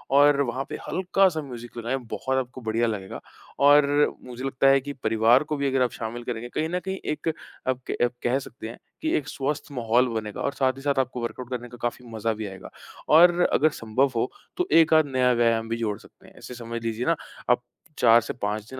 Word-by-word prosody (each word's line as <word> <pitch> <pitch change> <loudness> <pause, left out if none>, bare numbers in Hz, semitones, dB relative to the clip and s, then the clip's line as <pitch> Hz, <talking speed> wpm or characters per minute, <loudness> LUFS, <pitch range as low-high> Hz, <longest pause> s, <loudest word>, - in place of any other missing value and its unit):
और 145 0 +6
वहाँ 130 0 -1
पे - - -4
हल्का-सा 185 -2 +2
म्यूज़िक 120 -4 -9
लगाएँ, 120 +3 -2
बहुत 130 +1 -3
आपको 130 0 -4
बढ़िया 115 +1 0
लगेगा 100 -4 -5 0.4
और 145 0 +5
मुझे 125 0 -8
लगता 135 0 +1
है 135 0 +5
कि 145 +2 -6
परिवार 115 +4 +4
को 150 0 -3
भी 140 0 0
अगर 135 -1 +1
आप 125 - +2
शामिल 115 +1 -6
करेंगे 120 0 -5
कहीं 155 +5 -2
न 180 +1 -1
कहीं 190 0 -3
एक 155 - -5 0.4
आप 130 -1 0
के - - -2
आप 120 - -1
कह 125 +2 +2
सकते 120 -4 -9
हैं, 115 - -9 0.2
कि 315 - 0
एक 145 - -4
स्वस्थ 145 +1 -3
माहौल 120 -1 +2
बनेगा 110 -3 -4
और 140 - -1
साथ 130 -1 +1
ही - - -9
साथ 140 -1 +1
आपको 125 -1 -1
वर्कआउट 120 +1 -5
करने 120 -1 -5
का 120 - -11
काफ़ी 120 +1 -3
मज़ा 110 0 -1
भी 110 -1 -5
आएगा 95 -2 -10 0.5
और 175 +2 +7
अगर 155 +3 +4
संभव 125 +5 +1
हो, 115 +2 0 0.3
तो 360 0 0
एक-आध 160 -1 +6
नया 130 -2 +2
व्यायाम 115 -1 +1
भी 115 - -1
जोड़ 110 -3 -2
सकते - - -19
हैं। - - -18
ऐसे - - -9
समझ 115 0 -6
लीजिए 115 +1 -2
ना, 165 - +3 0.3
आप 125 0 +3 0.3
4 115 0 +6
से 115 - -5
5 105 -2 -3
दिन 130 - -8
125 Hz, 225 wpm, -25 LUFS, 115-140 Hz, 0.5 s, और